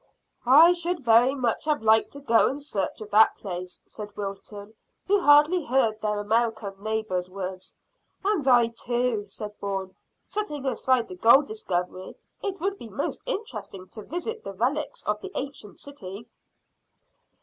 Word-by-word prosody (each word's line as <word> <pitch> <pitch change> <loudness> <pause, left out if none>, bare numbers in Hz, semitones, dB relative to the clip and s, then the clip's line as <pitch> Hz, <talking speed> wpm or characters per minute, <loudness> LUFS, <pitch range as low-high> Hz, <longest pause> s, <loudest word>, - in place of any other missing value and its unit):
"I 315 +7 +8
should 345 -4 -2
very 240 +4 +5
much 250 0 -1
have 300 -6 0
liked 220 0 +4
to 285 - -10
go 230 -5 +4
in 275 - -2
search 225 -9 -3
of 210 - -9
that 220 +2 +5
place," 180 -2 -6
said 210 -1 -10
Wilton, 205 +1 -7 0.3
who 405 +1 +3
hardly 300 +2 +5
heard 225 -4 +1
their 210 -1 -1
American 220 -1 0
neighbour's 215 -4 -2
words. 185 -1 -7 0.5
"And 390 -9 +1
I 240 -3 +5
too," 235 -2 -2
said 210 +1 -8
Bourne. 195 -2 -4 0.3
"Setting 300 -10 -4
aside 255 -1 +1
the - - -9
gold 235 +9 +6
discovery, 185 -5 -4 0.3
it 390 -2 -4
would 390 +3 -2
be 230 - -9
most 235 +8 -3
interesting 215 - -4
to 215 - -9
visit 355 - -5
the 195 - -6
relics 265 +9 -2
of 210 0 -2
the - - -8
ancient 265 -7 -5
city." 230 -6 -10
230 Hz, 155 wpm, -26 LUFS, 205-285 Hz, 0.5 s, I